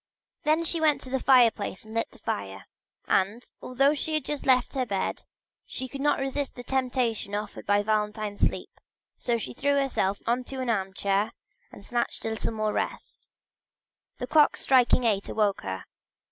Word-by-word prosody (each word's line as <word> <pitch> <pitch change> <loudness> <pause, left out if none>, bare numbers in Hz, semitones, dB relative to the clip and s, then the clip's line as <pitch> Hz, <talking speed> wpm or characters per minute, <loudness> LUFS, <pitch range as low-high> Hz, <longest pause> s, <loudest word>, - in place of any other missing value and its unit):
Then 315 +1 +2
she 335 0 +1
went 305 -2 +4
to 255 - -9
the 265 - +1
fireplace 235 -7 +3
and 220 - -11
lit 230 0 -1
the - - -18
fire, 95 -1 -4 0.4
and 205 +6 +1 0.2
although 275 +3 +2
she 310 +1 0
had 310 - -1
just 295 -2 -4
left 255 -2 +3
her 265 -2 0
bed, 195 -2 -2 0.4
she 260 - -2
could 275 +2 -7
not 295 +1 +3
resist 270 +1 -2
the 245 - -8
temptation 250 -5 -1
offered 210 0 -5
by 205 0 +3
Valentine's 210 -1 -1
sleep, - - -1 0.4
so 240 -1 +1
she 225 - -6
threw 285 +3 +1
herself 255 -8 0
into 250 +3 -1
an 255 -2 0
armchair 195 +1 0 0.4
to - - -12
snatch 240 +1 -2
a - - 0
little 220 0 -2
more 215 -1 -1
rest. - - -4 0.9
The - - -3
clock 305 -2 +4
striking 255 -1 +4
eight 205 -4 +1
awoke 210 -3 +1
her. 95 -1 -5
235 Hz, 175 wpm, -27 LUFS, 205-270 Hz, 0.9 s, went